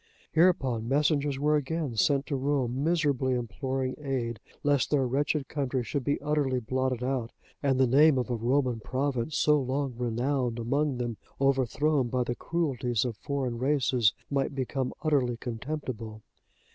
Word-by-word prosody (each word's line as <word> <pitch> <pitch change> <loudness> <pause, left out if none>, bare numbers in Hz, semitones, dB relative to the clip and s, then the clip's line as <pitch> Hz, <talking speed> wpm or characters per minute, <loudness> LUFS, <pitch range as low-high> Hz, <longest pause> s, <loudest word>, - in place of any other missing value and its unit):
Hereupon 135 -10 +2
messengers 145 0 +2
were 150 +2 +2
again 150 -2 -2
sent 135 +6 +2
to 145 - -2
Rome 135 -1 0
miserably 145 -6 +1
imploring 130 +3 -2
aid, 125 -6 -2 0.2
lest 145 -3 +2
their 140 -3 +2
wretched 140 +2 0
country 135 -3 -1
should 130 +5 -3
be 145 - 0
utterly 145 -3 +1
blotted 130 +1 -1
out, 125 -3 -1 0.3
and 135 -2 +1
the 130 - +6
name 140 +3 +5
of 125 0 -1
a - - +1
Roman 125 +1 +1
province, 130 +3 -2
so 150 -1 +4
long 135 +1 -1
renowned 125 +1 -1
among 135 +4 0
them, 120 -3 -3 0.2
overthrown 135 +1 +2
by 125 +1 0
the 120 - -2
cruelties 130 -7 -1
of 120 -3 -3
foreign 130 -2 -3
races, 130 -5 +3 0.2
might 140 0 0
become 130 -1 -2
utterly 135 -6 +2
contemptible. 115 -3 -5
130 Hz, 150 wpm, -28 LUFS, 125-145 Hz, 0.3 s, the